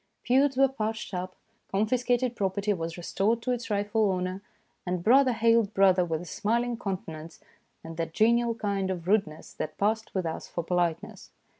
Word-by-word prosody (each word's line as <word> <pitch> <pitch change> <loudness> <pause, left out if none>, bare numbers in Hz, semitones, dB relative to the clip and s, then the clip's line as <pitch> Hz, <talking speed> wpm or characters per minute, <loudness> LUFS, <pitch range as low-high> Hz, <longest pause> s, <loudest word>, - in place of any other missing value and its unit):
Feuds 265 +2 +3
were 270 0 +6
patched 220 -5 -4
up, 185 0 -4 0.4
confiscated 245 +4 +1
property 200 +1 0
was 165 -2 -5
restored 200 +6 0
to 255 - -1
its 240 -2 -3
rightful 205 0 +1
owner, 185 +1 -3 0.4
and 180 -1 -3
brother 260 +4 +5
hailed 230 -2 +2
brother 190 -2 +5
with 165 -2 -2
a - - -8
smiling 235 +6 -1
countenance 165 -7 -6 0.4
and 165 0 -9
that 165 -1 -2
genial 235 +4 +2
kind 200 -3 -2
of 175 -2 -4
rudeness 190 -7 0
that 155 - -5
passed 220 +2 -1
with 185 -2 0
us 160 0 -4
for 170 - -4
politeness. 170 -1 -2
200 Hz, 165 wpm, -28 LUFS, 180-230 Hz, 0.4 s, were